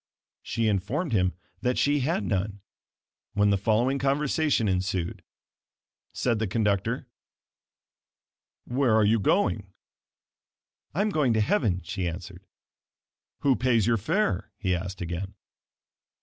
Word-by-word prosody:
She 115 Hz, -1 st, -1 dB
informed 115 Hz, -, -1 dB
him 90 Hz, -3 st, +2 dB, 0.3 s
that 125 Hz, 0 st, 0 dB
she 145 Hz, +1 st, +3 dB
had 135 Hz, -3 st, 0 dB
none, 100 Hz, +1 st, -2 dB, 0.7 s
when 105 Hz, 0 st, +3 dB
the -, -, +4 dB
following 120 Hz, +6 st, +2 dB
conversation 140 Hz, -2 st, +1 dB
ensued. 95 Hz, -2 st, -1 dB, 0.9 s
Said 120 Hz, -3 st, 0 dB
the 110 Hz, -, 0 dB
conductor: 105 Hz, +2 st, 0 dB, 1.6 s
"Where 125 Hz, -2 st, +2 dB
are 110 Hz, -1 st, +4 dB
you 110 Hz, +2 st, +3 dB
going?" 105 Hz, -, +1 dB, 1.2 s
"I 190 Hz, -, +2 dB
am 210 Hz, +1 st, +1 dB
going 145 Hz, -9 st, +2 dB
to 110 Hz, -, +2 dB
heaven," 105 Hz, -, +1 dB
she 90 Hz, +1 st, -3 dB
answered. 90 Hz, +2 st, -7 dB, 0.9 s
"Who 140 Hz, -3 st, +4 dB
pays 120 Hz, -5 st, +2 dB
your 115 Hz, -1 st, +3 dB
fare?" 170 Hz, -, 0 dB
he 95 Hz, -6 st, 0 dB
asked 90 Hz, +2 st, -5 dB
again. 90 Hz, +3 st, -4 dB
110 Hz, 120 wpm, -27 LUFS, 95-135 Hz, 1.6 s, the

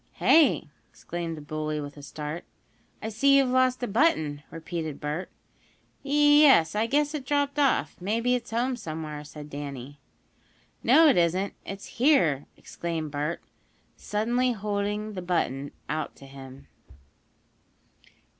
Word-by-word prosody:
"Hey?" 320 Hz, -2 st, +4 dB, 0.2 s
exclaimed 170 Hz, -2 st, -6 dB
the -, -, -8 dB
bully, 155 Hz, 0 st, -3 dB
with 145 Hz, -1 st, -7 dB
a 145 Hz, -, -11 dB
start. 150 Hz, +4 st, -6 dB, 0.6 s
"I 220 Hz, -, -2 dB
see 275 Hz, +6 st, +4 dB
you've 270 Hz, -2 st, +3 dB
lost 255 Hz, 0 st, +2 dB
a -, -, 0 dB
button," 195 Hz, -, +1 dB
repeated 160 Hz, -2 st, -5 dB
Bert. 150 Hz, +5 st, -4 dB, 0.7 s
"Yes, 290 Hz, -, +5 dB
I 215 Hz, +2 st, +1 dB
guess 290 Hz, +4 st, +1 dB
it 295 Hz, -3 st, -4 dB
dropped 285 Hz, +1 st, 0 dB
off. 280 Hz, -2 st, +1 dB
Maybe 230 Hz, +6 st, 0 dB
it's 245 Hz, -1 st, -2 dB
home 245 Hz, +3 st, 0 dB
somewhere," 155 Hz, -7 st, -6 dB
said 150 Hz, 0 st, -10 dB
Danny. 140 Hz, -1 st, -7 dB, 0.8 s
"No, 325 Hz, 0 st, +6 dB
it 280 Hz, -, +4 dB
isn't 180 Hz, +3 st, +1 dB
it's 195 Hz, 0 st, -7 dB, 0.2 s
here!" 170 Hz, -, +3 dB
exclaimed 165 Hz, -3 st, -5 dB
Bert, 150 Hz, +3 st, -3 dB, 0.5 s
suddenly 240 Hz, +4 st, 0 dB
holding 210 Hz, 0 st, -3 dB
the 185 Hz, -, -5 dB
button 145 Hz, -6 st, -1 dB, 0.2 s
out 155 Hz, 0 st, -3 dB
to 135 Hz, -, -14 dB
him. 135 Hz, 0 st, -12 dB
185 Hz, 135 wpm, -27 LUFS, 150-250 Hz, 0.8 s, No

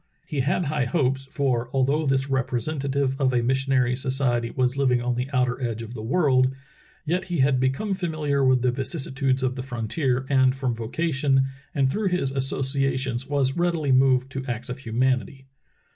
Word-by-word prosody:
He 145 Hz, -, -4 dB
had 145 Hz, +6 st, +1 dB
high 145 Hz, -2 st, 0 dB
hopes, 135 Hz, 0 st, 0 dB
for 125 Hz, -5 st, -1 dB
although 140 Hz, +3 st, +1 dB
this 135 Hz, 0 st, +1 dB
representative 135 Hz, +1 st, -1 dB
of 130 Hz, -1 st, +3 dB
a 120 Hz, -1 st, +2 dB
missionary 130 Hz, 0 st, +1 dB
society 130 Hz, -3 st, 0 dB
was 125 Hz, +1 st, 0 dB
living 130 Hz, -3 st, +2 dB
on 120 Hz, +1 st, -1 dB
the 125 Hz, +2 st, -3 dB
outer 125 Hz, -1 st, 0 dB
edge 115 Hz, -2 st, -2 dB
of 115 Hz, +1 st, -9 dB
the 110 Hz, -, -6 dB
world, 130 Hz, 0 st, +2 dB, 0.5 s
yet 180 Hz, +4 st, -1 dB
he 175 Hz, -2 st, -3 dB
had 130 Hz, -1 st, +3 dB
be 130 Hz, +1 st, +3 dB
come 195 Hz, +10 st, -2 dB
familiar 155 Hz, -6 st, -1 dB
with 130 Hz, -1 st, +3 dB
the 125 Hz, -, +3 dB
vicissitudes 135 Hz, 0 st, -1 dB
of 130 Hz, -1 st, +1 dB
the 130 Hz, -, -4 dB
frontier, 125 Hz, +2 st, -2 dB
and 130 Hz, -2 st, +3 dB
from 130 Hz, -2 st, -1 dB
vocation 135 Hz, +3 st, 0 dB, 0.3 s
and 135 Hz, -2 st, +3 dB
through 205 Hz, +9 st, -1 dB
his 180 Hz, -7 st, 0 dB
associations 135 Hz, -1 st, -1 dB
was 140 Hz, -2 st, 0 dB
readily 170 Hz, -5 st, 0 dB
moved 130 Hz, 0 st, +3 dB
to 135 Hz, 0 st, -4 dB
acts 120 Hz, 0 st, -4 dB
of 125 Hz, -, -5 dB
humanity. 130 Hz, +1 st, -1 dB
135 Hz, 175 wpm, -24 LUFS, 125-140 Hz, 0.5 s, of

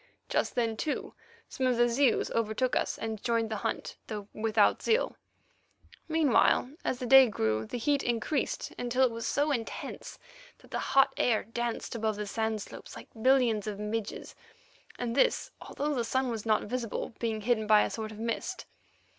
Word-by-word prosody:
Just -, -, 0 dB
then, 230 Hz, -3 st, 0 dB
too, 300 Hz, -, -3 dB, 0.3 s
some 260 Hz, -2 st, -1 dB
of 250 Hz, -2 st, +2 dB
the 240 Hz, 0 st, +5 dB
Zeus 240 Hz, +1 st, +2 dB
overtook 230 Hz, +3 st, 0 dB
us -, -, 0 dB
and 220 Hz, -2 st, -4 dB
joined 230 Hz, -2 st, 0 dB
the 215 Hz, -, -1 dB
hunt, -, -, -3 dB
though 210 Hz, -2 st, -5 dB
without 215 Hz, -1 st, +2 dB
zeal. 455 Hz, +1 st, +1 dB, 0.9 s
Meanwhile, 310 Hz, -5 st, +3 dB
as 255 Hz, -, -1 dB
the 250 Hz, -, -4 dB
day 265 Hz, +1 st, +8 dB
grew, 110 Hz, -, -1 dB
the -, -, -4 dB
heat 280 Hz, +4 st, +1 dB
increased 240 Hz, +4 st, -1 dB
until 245 Hz, +2 st, +1 dB
it 250 Hz, -, 0 dB
was 230 Hz, 0 st, -4 dB
so 290 Hz, +2 st, +1 dB
intense 230 Hz, -5 st, -5 dB, 0.4 s
that -, -, -20 dB
the -, -, -2 dB
hot 270 Hz, 0 st, +3 dB
air 230 Hz, -3 st, +2 dB
danced 235 Hz, +1 st, -3 dB
above 220 Hz, -2 st, -1 dB
the 210 Hz, 0 st, -4 dB
sand 220 Hz, 0 st, -2 dB
slopes -, -, -11 dB
like -, -, -11 dB
billions 245 Hz, -5 st, +3 dB
of 210 Hz, -2 st, -3 dB
midges, 210 Hz, +1 st, -4 dB, 0.6 s
and 235 Hz, -1 st, -2 dB
this -, -, +2 dB
although 295 Hz, +1 st, -3 dB
the 245 Hz, -4 st, 0 dB
sun 260 Hz, +2 st, 0 dB
was 225 Hz, -1 st, -5 dB
not 215 Hz, -1 st, +3 dB
visible, 235 Hz, 0 st, -3 dB
being 220 Hz, -2 st, -2 dB
hidden 220 Hz, -1 st, +1 dB
by 210 Hz, -1 st, +6 dB
a -, -, -2 dB
sort 220 Hz, -1 st, -5 dB
of 215 Hz, -, -10 dB
mist. 230 Hz, +11 st, -3 dB
230 Hz, 180 wpm, -30 LUFS, 220-255 Hz, 0.9 s, day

